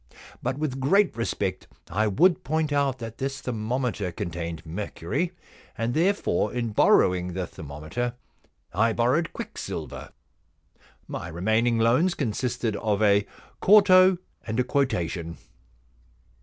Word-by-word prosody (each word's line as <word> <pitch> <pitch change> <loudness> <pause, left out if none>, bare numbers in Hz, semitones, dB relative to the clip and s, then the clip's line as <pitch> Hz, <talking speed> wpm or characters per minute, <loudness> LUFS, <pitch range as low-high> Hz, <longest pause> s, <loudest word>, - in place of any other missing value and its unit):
But 130 +2 -2
with 145 -3 -2
great 195 +9 +3
respect 100 -5 -2 0.2
I 105 +5 0
would 170 - +3
point 155 +1 0
out 140 -2 +1
that 115 -2 -8
this 135 0 -3
thermometer 115 -4 -2
con 85 - -4
tained 85 -1 -5
mercury, 100 - -3 0.5
and 115 +1 -1
therefore 170 - +1
in 120 -2 -2
borrowing 90 -3 +3
the 95 0 -2
thermometer 80 +13 -5 0.6
I 115 +5 +2
borrowed 125 +9 +1
quicksilver. - - -6 1.0
My 80 - -5
remaining 110 +8 +1
loans 125 +11 +3
consisted 120 -3 -2
of 110 -2 0
a 100 0 +4 0.3
quarto 190 -2 +6 0.3
and 110 +2 -2
a - - +4
quotation.' 90 -11 -1
115 Hz, 120 wpm, -26 LUFS, 95-135 Hz, 1.0 s, quarto